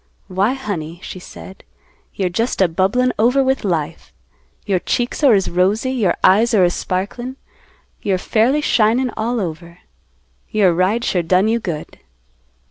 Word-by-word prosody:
"Why, 195 +6 +1
honey," 175 - -5
she 185 - -7
said, 190 +1 -12 0.5
"you're 190 - 0
just 225 +8 -2
a 190 - +5
bubblin' 195 +9 +1
over 250 +5 +3
with 265 -1 0
life. 165 -4 -3 0.5
Your 195 -4 +1
cheeks 245 +9 -2
are 270 -5 +6
as 195 -1 +1
rosy; 200 +8 +1
your 220 -9 +1
eyes 225 +5 +4
are 190 - +5
as 175 0 +2
sparklin', 240 +8 -4 0.6
you're 195 -2 0
fairly 235 +10 +1
shinin' 240 0 +2
all 235 +2 -1
over. 170 -2 -6 0.7
Your 200 -5 +3
ride 190 +7 +1
sure 180 - +1
done 180 +4 +2
you 230 +1 +1
good." 170 -8 -6
200 Hz, 150 wpm, -18 LUFS, 180-240 Hz, 0.7 s, are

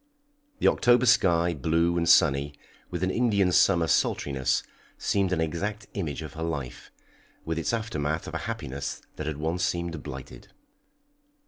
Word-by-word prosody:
The - - +2
October 120 0 +4
sky, 85 -7 +4
blue 85 +4 +1
and 85 -1 +1
sunny, 70 +1 +4 0.3
with 90 0 -4
an 95 - +1
Indian 100 -6 +2
summer 90 -1 +4
sultriness, 70 -4 +1 0.3
seemed 100 -2 0
an 90 - 0
exact 100 +6 -2
image 80 -6 -3
of 75 - -8
her 80 - -8
life, 70 -7 -5 0.5
with 80 0 -2
its - - -1
aftermath 80 -10 -2
of - - -7
a - - -1
happiness 70 +1 -5
that 75 - -4
had 75 -2 -3
once 80 +4 -2
seemed 85 -3 -2
blighted. 65 0 -9
85 Hz, 150 wpm, -27 LUFS, 75-95 Hz, 0.5 s, October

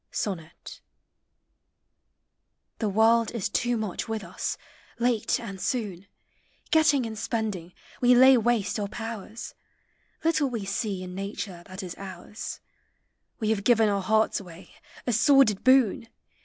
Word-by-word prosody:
SONNET. 170 -5 -5 2.0
The 215 - 0
World 225 +2 +4
is 200 -4 -1
too 240 +3 0
much 215 -4 -3
with 220 -2 -3
us; - - -4 0.4
late 235 -2 +1
and 195 -5 -7
soon. 200 -6 -3 0.6
Getting 305 -5 +4
and 220 -1 -5
spending, 210 -6 -3 0.3
we 250 0 +6
lay 260 +2 +8
waste 230 -3 +1
our 205 - -1
powers; 225 0 -7 0.7
Little 315 -4 +2
we 230 -5 -4
see 195 -1 -2
in 180 0 -7
nature 195 -2 -5
that 185 +1 -7
is 180 -2 -6
ours; 195 +3 -7 0.8
We 220 -2 0
have 205 -3 -1
given 225 -2 +4
our 200 -1 0
hearts 220 +3 +2
away, 180 -2 -12 0.3
a 245 - 0
sordid 240 -3 +4
boon 255 -4 +4
220 Hz, 130 wpm, -27 LUFS, 195-240 Hz, 2.0 s, lay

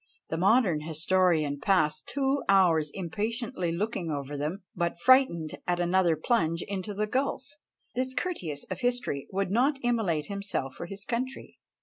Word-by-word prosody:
The 160 - -1
modern 190 -3 +3
historian 160 -2 +1
passed 155 -3 +1
two 275 0 0
hours 170 -6 +4
impatiently 205 - -3
looking 185 -1 -2
over 145 -1 -3
them, 155 +8 -3
but 170 -1 -1
frightened 170 - +4
at 175 0 +1
another 175 -1 +3
plunge 165 - +1
into 200 +1 -4
the 210 +1 0
gulf, 260 +3 -1 0.5
this 260 +1 -2
Curtius 170 - -3
of - - -3
history 245 - -1
would 195 -1 -1
not 265 +7 +3
immolate 210 -11 +1
himself 200 -10 -3
for 170 - -7
his 195 +2 -7
country! 255 +3 -4
185 Hz, 145 wpm, -28 LUFS, 165-235 Hz, 0.5 s, hours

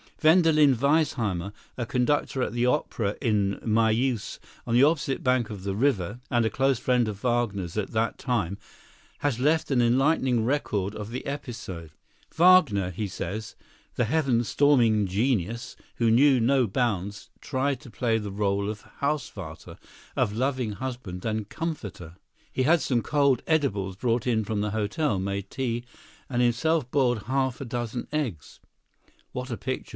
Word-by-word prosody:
Wendelin 155 -4 +5
Weissheimer, 115 - +1 0.3
a 120 - -2
conductor 130 +2 0
at - - -3
the 120 0 +1
opera 120 -6 0
in 100 -4 +1
Mayeuse 115 +1 +1 0.3
on 115 - +1
the 125 - +6
opposite 145 -3 +1
bank 125 -3 +2
of 100 -4 -7
the 100 -1 -2
river 110 -4 0
and 120 -2 +2
a - - +2
close 135 +1 +1
friend 125 -1 +1
of 105 -1 -6
Wagner's 110 -8 -1
at 105 -2 -2
that 110 0 -1
time, 105 -8 -1 0.6
has 140 -5 -1
left 155 +3 +2
an 125 -3 +3
enlightening 130 0 +2
record 105 -7 -1
of 105 0 -6
the 125 +2 -5
episode. 115 - -6 0.4
Wagner, 160 - +5
he 105 +4 -3
says, 105 +4 -5 0.4
"the 120 - +1
heaven 130 -2 +1
storming 115 -6 +3
genius, 115 +2 -1 0.2
who 115 -1 +2
knew 130 +2 +5
no 125 +1 +3
bounds, 100 -3 -2
tried 135 -1 -1
to 125 - -12
play 115 +1 0
the 105 -2 -5
rôle 100 0 0
of 105 0 -6 0.2
Hausvater—of 105 - -4
loving 130 -3 -1
husband 120 -6 -6
and 110 -2 -2
comforter. 105 - -5 0.4
He 130 - 0
had 160 +4 +4
some 125 -3 +1
cold 140 -2 +2
edibles 105 - 0
brought 115 +3 0
in 110 -3 +2
from 105 0 -1
the 105 0 -1
hotel, 105 +3 0
made 100 +1 -3
tea, 120 -3 -2 0.5
and 125 -2 +1
himself 125 +4 +1
boiled 125 -6 +2
half 130 -1 -1
a 135 - -5
dozen 120 0 -4
eggs. 125 - -4 0.7
[What 125 +1 -5
a 120 - -3
picture! 130 0 -4
120 Hz, 155 wpm, -26 LUFS, 105-135 Hz, 0.7 s, the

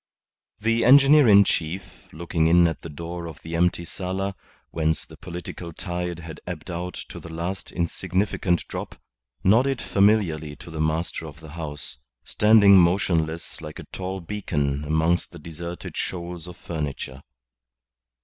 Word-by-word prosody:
The 115 +2 +2
engineer 140 +2 +7
in 100 -1 +8
chief, 90 0 -3
looking 80 0 0
in 85 +1 +6
at 80 - -3
the 80 - -8
door 85 +3 -6
of 80 - -9
the 80 +1 -5
empty 85 0 +1
sala, 95 +3 -3 0.4
whence 80 -1 0
the - - -13
political 85 -1 -7
tide 90 0 -4
had 80 -2 -9
ebbed - - -6
out 90 +1 -4
to - - -8
the 85 - -10
last 85 +4 -4
insignificant 90 +1 0
drop, - - -6 0.4
nodded 125 +7 +4
familiarly 95 -9 +2
to 85 - -12
the 80 -1 -3
master 80 +1 -1
of 75 0 -11
the 80 -1 -12
house, 75 -5 -5 0.2
standing 105 -2 +6
motionless 85 -3 +1
like 75 -1 -8
a - - -8
tall 95 0 -4
beacon 75 -7 -2
amongst 80 +3 +1
the - - -9
deserted 85 +3 -7
shoals 90 -1 -4
of 90 - -10
furniture. 70 -4 -5
85 Hz, 150 wpm, -25 LUFS, 80-95 Hz, 0.4 s, in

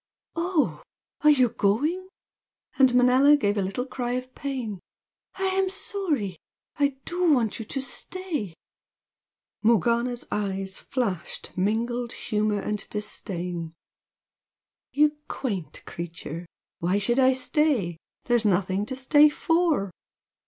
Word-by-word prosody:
"Oh, 335 -2 0 0.4
are 300 - +6
you 260 -5 +5
going?" 300 - 0 0.7
and 265 -1 +7
Manella 255 +4 +6
gave 205 -6 +1
a 205 - +1
little 195 +6 -2
cry 250 -2 -3
of 255 0 -4
pain 250 -8 -4 0.6
"I 385 - -4
am 380 0 +1
sorry! 350 - -2 0.4
I 280 -2 +1
do 350 -1 +2
want 235 -7 +2
you 225 - -5
to 270 +5 -3
stay!" 300 - -4 1.1
Morgana's 235 +2 +2
eyes 195 -2 -2
flashed 200 - -3
mingled 235 +5 0
humour 210 -1 0
and 210 0 -3
disdain. 180 -5 -4 1.2
"You 300 +1 +3
quaint 200 - -4
creature! 170 0 -7 0.3
Why 180 +4 +1
should 240 +5 +1
I 260 0 +6
stay? 260 - +1 0.3
There's 240 -2 +2
nothing 195 0 +1
to 260 - -4
stay 290 +3 +6
for!" 325 - +1
240 Hz, 115 wpm, -26 LUFS, 200-290 Hz, 1.2 s, and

